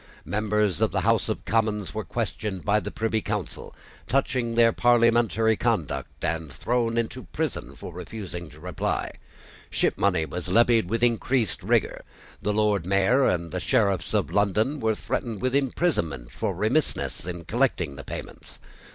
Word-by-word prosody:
Members 105 Hz, -3 st, 0 dB
of -, -, +4 dB
the -, -, -1 dB
House -, -, +2 dB
of -, -, -3 dB
Commons 105 Hz, -2 st, 0 dB
were 110 Hz, -, -3 dB
questioned 95 Hz, +2 st, -3 dB
by 105 Hz, +1 st, +3 dB
the -, -, -5 dB
Privy 110 Hz, -1 st, -1 dB
Council -, -, -4 dB, 0.3 s
touching 125 Hz, -2 st, 0 dB
their 115 Hz, 0 st, +6 dB
parliamentary 115 Hz, -2 st, +4 dB
conduct, 70 Hz, -9 st, -2 dB
and 80 Hz, -3 st, -2 dB
thrown 115 Hz, +7 st, 0 dB
into 115 Hz, +2 st, -2 dB
prison -, -, -4 dB
for 90 Hz, -, -9 dB
refusing 90 Hz, -2 st, -7 dB
to 75 Hz, +1 st, -15 dB
reply. 90 Hz, +1 st, -2 dB, 0.6 s
Shipmoney 90 Hz, -5 st, +1 dB
was 90 Hz, -1 st, -5 dB
levied 115 Hz, -1 st, +4 dB
with 115 Hz, +2 st, 0 dB
increased 120 Hz, -2 st, +1 dB
rigour. -, -, +1 dB, 0.4 s
The 105 Hz, -, 0 dB
Lord 105 Hz, -3 st, +2 dB
Mayor 100 Hz, +9 st, +3 dB
and 85 Hz, -2 st, 0 dB
the -, -, -2 dB
Sheriffs 95 Hz, 0 st, +1 dB
of 105 Hz, -, +1 dB
London 105 Hz, +8 st, +1 dB
were 110 Hz, -2 st, +1 dB
threatened 110 Hz, 0 st, -3 dB
with 130 Hz, +3 st, -1 dB
imprisonment 120 Hz, -, 0 dB
for -, -, -2 dB
remissness -, -, 0 dB
in 85 Hz, -2 st, -5 dB
collecting 110 Hz, -, 0 dB
the 70 Hz, -, -8 dB
payments. -, -, -8 dB
105 Hz, 150 wpm, -26 LUFS, 90-115 Hz, 0.6 s, their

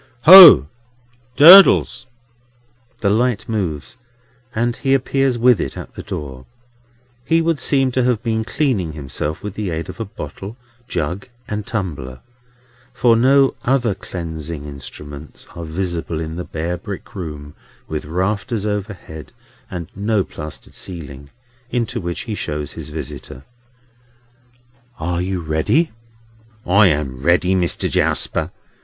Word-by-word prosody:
"Ho! 175 Hz, -, +10 dB, 0.7 s
Durdles!" 165 Hz, -6 st, +7 dB, 0.9 s
The 100 Hz, -, +2 dB
light 120 Hz, +1 st, 0 dB
moves, 100 Hz, -, -4 dB, 0.6 s
and 120 Hz, +1 st, 0 dB
he 135 Hz, -1 st, +1 dB
appears 135 Hz, -1 st, 0 dB
with 120 Hz, -4 st, +4 dB
it -, -, -5 dB
at -, -, -9 dB
the -, -, -8 dB
door. 65 Hz, -4 st, -7 dB, 0.8 s
He 165 Hz, +5 st, +2 dB
would 165 Hz, -2 st, 0 dB
seem 135 Hz, 0 st, +1 dB
to 130 Hz, 0 st, 0 dB
have 125 Hz, -2 st, 0 dB
been 110 Hz, -1 st, -1 dB
"cleaning 110 Hz, -, -1 dB
himself" 75 Hz, +1 st, -5 dB
with 105 Hz, -2 st, -5 dB
the 105 Hz, -2 st, -4 dB
aid 80 Hz, 0 st, -4 dB
of -, -, -9 dB
a 115 Hz, -, -3 dB
bottle, 95 Hz, +4 st, -9 dB, 0.3 s
jug, 90 Hz, +3 st, -4 dB, 0.2 s
and 105 Hz, -1 st, -5 dB
tumbler; 70 Hz, -, -5 dB, 0.7 s
for 120 Hz, -2 st, +4 dB
no 135 Hz, +3 st, +4 dB
other 120 Hz, -4 st, +1 dB
cleansing 80 Hz, -5 st, -7 dB
instruments 70 Hz, +1 st, -10 dB
are 85 Hz, -, -6 dB
visible 85 Hz, -1 st, -4 dB
in 80 Hz, 0 st, -5 dB
the 90 Hz, -, -5 dB
bare 85 Hz, +3 st, -4 dB
brick 95 Hz, +2 st, -9 dB
room 75 Hz, -6 st, -7 dB, 0.3 s
with 75 Hz, -1 st, -5 dB
rafters 100 Hz, -, -2 dB
overhead 100 Hz, -6 st, -6 dB, 0.4 s
and 85 Hz, -3 st, -6 dB
no 105 Hz, +1 st, 0 dB
plastered 75 Hz, -3 st, -10 dB
ceiling, 70 Hz, -6 st, -9 dB, 0.4 s
into 120 Hz, -1 st, -2 dB
which 85 Hz, -1 st, -4 dB
he 110 Hz, -, -5 dB
shows 75 Hz, -7 st, -4 dB
his 80 Hz, -2 st, -9 dB
visitor. 75 Hz, -3 st, -8 dB, 1.6 s
"Are 85 Hz, +2 st, -2 dB
you 90 Hz, -1 st, -3 dB
ready?" 80 Hz, -, 0 dB, 0.7 s
"I 100 Hz, +3 st, +5 dB
am 70 Hz, -5 st, -2 dB
ready, 85 Hz, +4 st, +2 dB
Mister 90 Hz, -2 st, 0 dB
Jarsper. -, -, 0 dB
95 Hz, 130 wpm, -19 LUFS, 80-115 Hz, 1.6 s, Ho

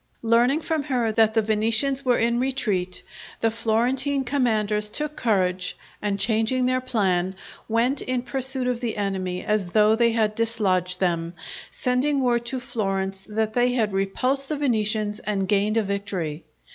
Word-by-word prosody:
Learning 240 Hz, +5 st, +3 dB
from 320 Hz, -1 st, -1 dB
her 250 Hz, -5 st, 0 dB
that 220 Hz, 0 st, +3 dB
the 225 Hz, -, +3 dB
Venetians 225 Hz, +6 st, +2 dB
were 250 Hz, -2 st, +3 dB
in 235 Hz, +1 st, +1 dB
retreat, 215 Hz, -9 st, -1 dB, 0.4 s
the 225 Hz, -, +2 dB
Florentine 250 Hz, +5 st, 0 dB
commanders 215 Hz, -6 st, 0 dB
took 300 Hz, +6 st, -3 dB
courage, 185 Hz, -5 st, 0 dB, 0.2 s
and 205 Hz, -1 st, -1 dB
changing 225 Hz, +4 st, +1 dB
their 255 Hz, 0 st, +1 dB
plan, 190 Hz, -7 st, 0 dB, 0.3 s
went 240 Hz, +5 st, +1 dB
in 255 Hz, -1 st, -2 dB
pursuit 265 Hz, 0 st, -1 dB
of 250 Hz, -1 st, -1 dB
the 230 Hz, -3 st, -3 dB
enemy 190 Hz, -3 st, -2 dB
as 210 Hz, -3 st, 0 dB
though 215 Hz, +4 st, +4 dB
they 235 Hz, 0 st, +3 dB
had 215 Hz, -2 st, +1 dB
dislodged 195 Hz, -6 st, 0 dB
them, 170 Hz, -2 st, -1 dB, 0.3 s
sending 265 Hz, +2 st, 0 dB
word 240 Hz, -1 st, +2 dB
to 260 Hz, +2 st, -2 dB
Florence 195 Hz, -6 st, -2 dB
that 220 Hz, 0 st, -1 dB
they 245 Hz, +1 st, +2 dB
had 220 Hz, -5 st, 0 dB
repulsed 255 Hz, +8 st, 0 dB
the 305 Hz, -, -1 dB
Venetians 215 Hz, -5 st, 0 dB
and 200 Hz, -4 st, -2 dB
gained 205 Hz, +2 st, +2 dB
a 225 Hz, -, +3 dB
victory. 190 Hz, -6 st, -4 dB
225 Hz, 160 wpm, -24 LUFS, 200-250 Hz, 0.4 s, though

